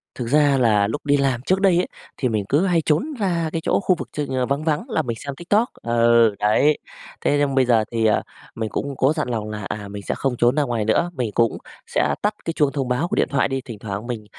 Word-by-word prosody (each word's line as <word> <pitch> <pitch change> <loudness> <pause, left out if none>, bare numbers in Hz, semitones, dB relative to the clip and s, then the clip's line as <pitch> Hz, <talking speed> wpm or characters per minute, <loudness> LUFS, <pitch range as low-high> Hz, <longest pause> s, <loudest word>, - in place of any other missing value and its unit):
Thực 120 - -4
ra 145 +1 +4
là 105 -5 +3
lúc 130 +8 -5
đi 145 0 +3
làm 135 -3 0
trước 185 +8 0
đây 190 -3 +4
ấy, 180 - +1 0.3
thì 130 - 0
mình 105 -3 -1
cứ 150 +7 +3
hay 175 -3 +2
trốn 190 - 0
ra 170 -5 0
cái 165 - -2
chỗ - - +2
khu 185 -2 +2
vực - - -7
ch - - -7
ờ, 130 -1 0
vắng 140 +4 -1
vắng 155 - -1
là - - +1
mình 115 -2 -4
xem 140 -1 -5
TikTok. 205 - +1
Ừ, 115 -2 +3
đấy. 140 +8 +3 0.4
Thế 145 - +2
nhưng 140 -2 +1
bây 130 -1 +4
giờ 115 -3 +3
thì, 115 -1 0
ờ, 110 - +3 0.3
mình 110 -1 -3
cũng 140 +4 -3
có 135 +3 +3
dặn 150 -4 -1
lòng 110 -3 -3
là, 105 -1 -5
à, 105 -1 -5
mình 100 0 -8
sẽ - - -1
không 135 -2 -1
trốn 120 +2 +3
ra 150 - +2
ngoài 120 -5 -1
nữa, 140 +11 +2
mình 125 -8 -2
cũng 115 -1 +2 0.3
sẽ 75 -1 +1
tắt 210 - +1
cái 165 - -2
chuông 145 -3 +2
thông 135 -3 -2
báo 125 +7 0
của 210 - -2
điện - - +2
thoại 140 -1 +1
đi, 135 -1 -3
thỉnh 115 -5 -9
thoảng 105 +2 -5
mình, 115 -4 -5
130 Hz, 265 wpm, -22 LUFS, 115-150 Hz, 0.4 s, ra